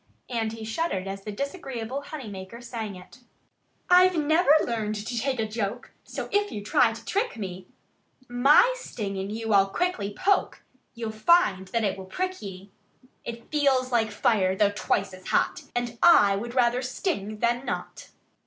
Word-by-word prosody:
And 225 -2 -1
he 225 -1 -7
shuddered 220 - -2
as 195 0 -6
the 210 - -5
disagreeable 270 - -4
honey 285 -4 -8
maker 195 +3 -8
sang 225 -4 -6
it: 185 +7 -14 0.7
"I've 360 0 +6
never 315 +2 +2
learned 220 -2 -2
to 225 +3 -3
take 260 +1 -1
a 220 - 0
joke; 215 +2 -4
So - - -6
if 410 0 +1
you 205 - -5
try 250 0 +3
to 225 - -10
trick 410 - -1
me, 185 -3 -6 0.6
My 275 - +5
sting 205 - -5
in 190 +1 -4
you 225 0 -2
I'll 195 -1 +5
quickly 225 - -1
poke 380 - 0 0.3
You'll 230 -2 -4
find 215 - +3
that 230 +4 -1
it 195 -2 -1
will 190 - -8
prick 370 - -3
ye! 195 -1 -9 0.5
It 235 0 -8
feels 270 -4 +2
like 225 -2 +2
fire 205 -3 +2
though 205 +1 +3
twice 200 -1 -1
as 185 0 -11
hot. - - 0
And 240 -1 -3
I 205 -13 +6
would 235 +5 -5
rather 245 0 +3
sting 250 - -3
than 240 +3 0
not!" - - -5
230 Hz, 170 wpm, -26 LUFS, 205-275 Hz, 0.7 s, I've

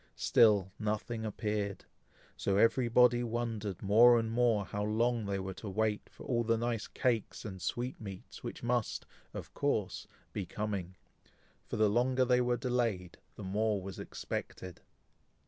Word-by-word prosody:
Still 100 -4 +4
nothing 110 +1 -2
appeared; 105 -2 -2 0.5
so 100 0 0
every 115 +3 +4
body 120 0 +5
wondered 115 -5 -3
more 115 +4 +7
and 115 -1 -1
more 115 -4 +2
how 100 +3 -3
long 115 +1 +1
they 100 -1 -1
were 95 0 -4
to 105 - -7
wait 105 +1 -1
for - - -13
all 120 -2 +1
the 115 0 +2
nice 115 -1 -2
cakes 115 -4 -1
and 95 -3 -7
sweetmeats 110 -6 -5
which - - -6
must, 120 -2 -1 0.3
of - - -8
course, - - -1 0.3
be 100 - -2
coming; 95 -2 -4 0.7
for - - -4
the 110 0 +4
longer 125 +4 +2
they 125 0 +4
were 120 0 +1
delayed, 115 -9 -1 0.2
the 105 - -8
more 105 +2 0
was 95 +1 -7
expected. 90 -2 -6
110 Hz, 150 wpm, -32 LUFS, 100-120 Hz, 0.7 s, more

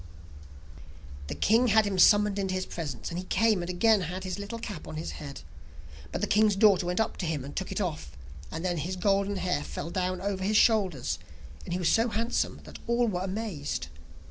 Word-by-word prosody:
The - - -4
king 230 +4 +3
had 220 -1 +5
him 195 -2 -1
summoned 205 +1 +5
into 190 -1 -1
his 185 - -2
presence, 145 -8 -5
and 170 - -3
he 185 - -6
came 210 +1 +2
and 175 - -5
again 210 +3 +3
had 180 +2 -4
his 185 +1 -4
little 205 +3 -5
cap 210 -8 -7
on - - -7
his 155 - -4
head. 140 -2 -8 0.7
But - - -3
the - - +2
king's 210 -1 +4
daughter 195 -3 +4
went 180 +2 -1
up 220 - 0
to 180 - -3
him 150 -5 -2
and 140 - -9
took 190 - -3
it - - -2
off, 165 - -4 0.3
and 165 +3 -5
then 175 -1 0
his 170 +5 -3
golden 200 +2 +1
hair 180 -6 0
fell 165 - -6
down 185 0 -1
over 190 0 -2
his 210 +2 +2
shoulders, 180 - +2 0.5
and - - -4
he - - 0
was 180 -2 +2
so 225 +2 +3
handsome 230 +2 -1
that - - -11
all 235 0 +2
were 180 -4 -1
amazed. 190 -6 -3
185 Hz, 215 wpm, -28 LUFS, 175-210 Hz, 0.7 s, had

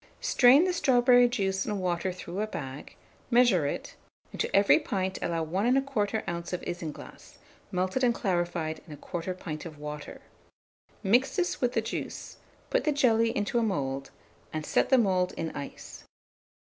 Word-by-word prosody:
Strain 265 +5 +6
the 365 0 +1
strawberry 245 -5 +5
juice 195 -5 -1
and 210 -2 -3
water 180 0 -1
through 180 +2 -6
a 215 - -1
bag; 135 -7 -7 0.3
measure 235 - +4
it, - - -5 0.4
and - - -4
to - - -1
every 200 0 +6
pint 190 -1 -2
allow 165 -1 -1
1 195 +10 +1
1/4 220 -5 -1
oz. 170 0 -4
of 180 - -3
isinglass, 170 -4 -7 0.3
melted 185 +8 -1
and 245 - +5
clarified 175 -4 -1
in 150 -2 -9
1/4 175 +4 -5
pint 155 -4 -6
of 160 -3 -9
water. 150 0 -7 0.8
Mix 240 +7 +3
this 360 -3 -1
with 245 -1 +1
the 225 - +1
juice; 220 - -6 0.3
put - - +2
the 305 - +2
jelly 230 -6 +3
into 205 +3 0
a - - +1
mould, 135 -10 -2 0.4
and 155 -1 -4
set - - +1
the 265 - +6
mould 185 -5 +2
in 160 -1 -3
ice. 140 - -8
190 Hz, 165 wpm, -28 LUFS, 170-240 Hz, 0.8 s, Strain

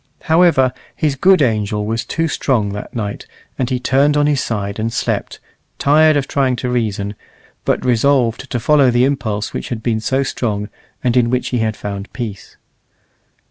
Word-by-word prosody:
However, 160 -6 +4 0.2
his 150 -3 0
good 185 +2 +4
angel 105 -3 0
was 115 +2 -2
too 165 +8 -1
strong 120 -8 0
that 105 +4 -7
night, 105 -3 -4 0.3
and 130 -1 0
he 130 -2 -1
turned 140 +4 +2
on 145 - +3
his 145 -2 +2
side 100 -2 -3
and 115 +1 -1
slept, 120 - -2 0.4
tired 155 +1 +4
of 140 -1 -1
trying 135 -3 +1
to 125 +1 -3
reason, 105 -4 -1 0.5
but - - 0
resolved 125 +1 +2
to 120 - -2
follow 140 +2 +4
the 120 +1 +3
impulse 110 -7 -2
which - - -5
had 115 -2 -4
been 115 -2 0
so 135 +5 0
strong, 105 -5 -2 0.3
and 125 -1 +1
in 120 -2 +3
which 125 +1 -1
he 125 - -1
had 110 -1 -1
found 100 0 -6
peace. 110 -5 -7
125 Hz, 180 wpm, -18 LUFS, 110-140 Hz, 0.5 s, However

